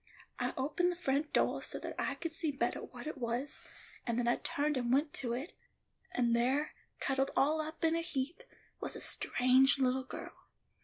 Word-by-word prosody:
I -, -, -1 dB
opened 305 Hz, +7 st, +1 dB
the -, -, -4 dB
front 295 Hz, -3 st, 0 dB
doah -, -, +2 dB
so -, -, -2 dB
that -, -, -5 dB
I -, -, 0 dB
could 330 Hz, -, -4 dB
see 320 Hz, -1 st, 0 dB
bettah 245 Hz, -4 st, -1 dB
what 240 Hz, -1 st, -9 dB
it 305 Hz, -2 st, -5 dB
was, 240 Hz, +4 st, -1 dB, 0.4 s
and 235 Hz, -1 st, -1 dB
then 245 Hz, -1 st, +1 dB
I 240 Hz, -, +3 dB
turned 295 Hz, +1 st, 0 dB
and 245 Hz, -2 st, 0 dB
went 290 Hz, +3 st, +3 dB
to 240 Hz, -3 st, -1 dB
it, 265 Hz, +8 st, -4 dB, 0.6 s
and 235 Hz, -1 st, +2 dB
there, 260 Hz, +6 st, +1 dB, 0.3 s
cuddled 270 Hz, 0 st, +1 dB
all 310 Hz, +3 st, +3 dB
up 315 Hz, +2 st, -6 dB
in 325 Hz, 0 st, +3 dB
a 335 Hz, -, +1 dB
heap, 305 Hz, -1 st, -2 dB, 0.4 s
was -, -, -2 dB
a -, -, -5 dB
strange 260 Hz, +2 st, +4 dB
little 260 Hz, 0 st, +2 dB
girl. 260 Hz, -, -9 dB
270 Hz, 195 wpm, -34 LUFS, 250-305 Hz, 0.6 s, strange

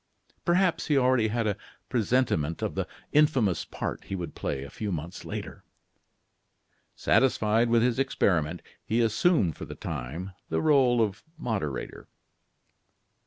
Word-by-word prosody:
Perhaps 180 Hz, 0 st, +2 dB
he 150 Hz, -, +3 dB
already 125 Hz, -3 st, +3 dB
had 115 Hz, +1 st, -1 dB
a 105 Hz, -2 st, +1 dB, 0.3 s
presentiment 110 Hz, -, +1 dB
of -, -, -1 dB
the -, -, -2 dB, 0.2 s
infamous 135 Hz, -, +3 dB
part -, -, -5 dB
he 95 Hz, -, -4 dB
would 90 Hz, -2 st, -5 dB
play 70 Hz, -1 st, -3 dB
a 70 Hz, -, -8 dB
few 105 Hz, -2 st, -4 dB
months 85 Hz, +1 st, -5 dB
later. -, -, -6 dB, 1.3 s
Satisfied 115 Hz, -3 st, +3 dB
with 115 Hz, 0 st, +4 dB
his 125 Hz, 0 st, +1 dB
experiment, 90 Hz, -, +1 dB, 0.2 s
he 115 Hz, +3 st, 0 dB
assumed, 115 Hz, -, +3 dB
for -, -, -7 dB
the -, -, -8 dB
time, 80 Hz, +10 st, -5 dB, 0.2 s
the -, -, 0 dB
role 130 Hz, -6 st, +4 dB
of 105 Hz, +1 st, -3 dB, 0.2 s
moderator. 100 Hz, -, -4 dB
115 Hz, 135 wpm, -28 LUFS, 90-130 Hz, 1.3 s, with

